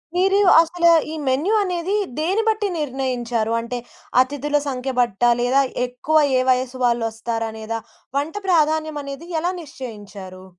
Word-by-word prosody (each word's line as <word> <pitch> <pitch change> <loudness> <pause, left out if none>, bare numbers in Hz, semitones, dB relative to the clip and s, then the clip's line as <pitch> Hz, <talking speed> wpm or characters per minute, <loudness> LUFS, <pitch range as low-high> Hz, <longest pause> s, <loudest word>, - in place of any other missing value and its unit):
మీరు 385 +2 +3 0.2
అసలు 340 +1 +3 0.2
ఈ - - -4
మెన్యూ 295 +12 +1
అనేది 365 +2 -2 0.2
దేన్ని 385 +8 +1
బట్టి 425 -1 0
నిర్ణయించారు? 250 -5 -2
అంటే 245 +1 -5 0.4
అతిథుల 290 +2 -1
సంఖ్య 265 0 -3
బట్టా? 240 0 +3
లేదా 265 +3 +3 0.2
ఎక్కువ 280 +6 +1 0.2
ఏ - - +3
వయసు 255 0 -1
వాళ్ళు 235 -1 +1
వస్తారనేదా? 225 0 -4 0.4
వంట 300 +5 -2
ప్రాధాన్యం 310 -3 +2
అనేది 280 +5 -8
ఎలా 350 +3 0
నిశ్చయించారు? 205 - -10
265 Hz, 130 wpm, -21 LUFS, 235-320 Hz, 0.4 s, మీరు